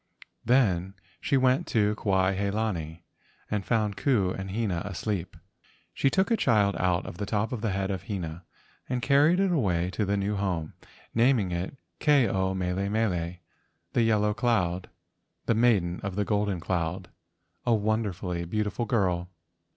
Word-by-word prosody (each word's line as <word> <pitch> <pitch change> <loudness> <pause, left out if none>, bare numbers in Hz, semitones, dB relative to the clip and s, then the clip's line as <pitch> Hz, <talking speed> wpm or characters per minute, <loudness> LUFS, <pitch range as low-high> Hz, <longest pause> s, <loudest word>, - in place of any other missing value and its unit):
Then 95 -7 +2 0.2
she 140 - +1
went 130 +5 +2
to 105 -3 +2
Kuai 95 -2 +1
he 100 +1 0
lani 90 -7 -3 0.5
and 105 -2 0
found 105 -2 0
Ku 105 -10 +2
and 95 0 -5
Hina 100 -4 -1
asleep. 100 -2 -4 0.6
She 135 - +2
took 190 - +1
a - - +5
child 105 - +2
out 90 0 +1
of 85 - -8
the 100 - -3
top 105 +1 0
of 120 -4 -3
the 110 - 0
head 95 0 -1
of 95 -2 -4
Hina 85 -4 -4 0.5
and 125 -1 -2
carried 150 +6 +4
it 195 -1 +2
away 90 - +1
to 105 - -1
the 100 0 0
new 100 +1 -1
home, 90 -6 -2 0.4
naming 115 -5 +3
it 85 +8 -3 0.2
Ke 145 -5 +4
ao 95 0 0
mele 95 +2 -1
mele 90 -6 0 0.6
(the - - +3
yellow 105 -2 +2
cloud), 95 -7 0 0.6
the - - +2
Maiden 105 -7 +2
of 100 -2 -4
the 105 0 0
Golden 105 -3 0
Cloud, 90 +1 -2 0.5
a - - -2
won¬ 110 +1 +1
derfully 90 -3 -4
beautiful 105 +3 -1
girl. 90 -5 0
100 Hz, 165 wpm, -27 LUFS, 90-115 Hz, 0.6 s, a